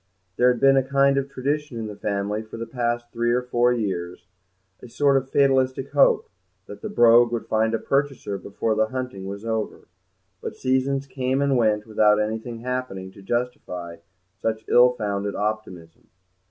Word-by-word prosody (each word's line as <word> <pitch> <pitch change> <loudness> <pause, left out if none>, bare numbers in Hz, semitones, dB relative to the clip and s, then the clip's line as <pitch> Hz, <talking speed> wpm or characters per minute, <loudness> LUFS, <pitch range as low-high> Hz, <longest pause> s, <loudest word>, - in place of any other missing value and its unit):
There 125 0 +4
had 125 - -3
been 135 0 +5
a - - +5
kind 140 +1 +3
of 140 0 -4
tradition 140 0 -3
in 115 - -4
the 105 -1 -7
family 105 +1 -2
for 110 0 -10
the 115 - -4
past 120 0 -2
three 120 0 0
or 125 +1 +1
four 125 0 +2
years, 95 -8 -3 0.6
a 125 - -11
sort 140 +3 +2
of 135 0 0
fatalistic 135 -1 +2
hope, 470 -2 +4 0.4
that - - -11
the 215 - -5
Brogue 120 - +5
would 120 -1 -3
find 110 +1 +1
a - - +1
purchaser 135 -7 -1
before 100 +4 -2
the 110 0 +2
hunting 125 -6 -5
was 100 +2 -7
over; 110 -1 -3 0.5
but - - -6
seasons 135 +1 0
came 130 0 -1
and 140 -1 +2
went 110 -3 +2
without 105 -1 +3
anything 110 +2 -3
happening 125 -7 -4
to 100 - -15
justify 95 -7 -4 0.4
such 110 0 -2
ill 125 +1 +6
founded 100 -3 -3
optimism. 105 -6 -5
120 Hz, 175 wpm, -24 LUFS, 105-130 Hz, 0.6 s, ill